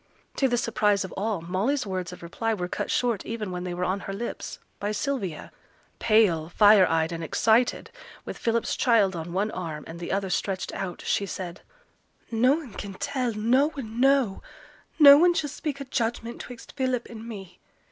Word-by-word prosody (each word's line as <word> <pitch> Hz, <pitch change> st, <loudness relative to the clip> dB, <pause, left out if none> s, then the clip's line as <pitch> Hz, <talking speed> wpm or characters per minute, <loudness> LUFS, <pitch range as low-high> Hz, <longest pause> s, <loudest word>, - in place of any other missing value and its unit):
To 270 Hz, -, +3 dB
the 245 Hz, -1 st, +1 dB
surprise 210 Hz, -4 st, +1 dB
of 185 Hz, -, -9 dB
all, 205 Hz, -2 st, -2 dB
Molly's 200 Hz, -, -1 dB
words 185 Hz, -3 st, -4 dB
of 180 Hz, -, -11 dB
reply 225 Hz, +6 st, -2 dB
were 180 Hz, -3 st, -3 dB
cut -, -, -4 dB
short 235 Hz, -5 st, 0 dB
even 220 Hz, -4 st, -4 dB
when 180 Hz, 0 st, -4 dB
they 180 Hz, -, -3 dB
were 180 Hz, -, -2 dB
on 185 Hz, +2 st, -1 dB
her 195 Hz, -, -6 dB
lips, 235 Hz, +4 st, -5 dB, 0.2 s
by 205 Hz, +1 st, -2 dB
Sylvia. 210 Hz, -, -3 dB, 0.5 s
Pale, 195 Hz, -8 st, +3 dB
fire 205 Hz, +1 st, +6 dB
eyed, 160 Hz, 0 st, +1 dB
and 165 Hz, -1 st, -4 dB
excited, 225 Hz, +8 st, +2 dB, 0.3 s
with -, -, -5 dB
Philip's 230 Hz, 0 st, 0 dB
child 220 Hz, -8 st, +3 dB
on 165 Hz, +1 st, -5 dB
one 200 Hz, +4 st, 0 dB
arm, 160 Hz, -5 st, -5 dB
and 165 Hz, +1 st, -9 dB
the 175 Hz, -, -5 dB
other 195 Hz, -1 st, -1 dB
stretched 185 Hz, +3 st, -2 dB
out, 185 Hz, -3 st, -5 dB
she 200 Hz, -, 0 dB
said, 185 Hz, -1 st, -6 dB, 0.7 s
'Noane 255 Hz, +3 st, +2 dB
can 195 Hz, -1 st, -7 dB
tell 250 Hz, +1 st, -2 dB
noane 245 Hz, +1 st, 0 dB
know. 270 Hz, -6 st, +3 dB, 0.6 s
No 285 Hz, -2 st, +10 dB
one 350 Hz, +1 st, +5 dB
shall 295 Hz, -4 st, -1 dB
speak 290 Hz, -2 st, -4 dB
a 275 Hz, -, -5 dB
judgment 235 Hz, -1 st, -2 dB
'twixt 245 Hz, -1 st, -10 dB
Philip 255 Hz, -3 st, -1 dB
and 230 Hz, 0 st, -9 dB
me. 195 Hz, -5 st, -9 dB
215 Hz, 180 wpm, -26 LUFS, 185-245 Hz, 0.7 s, No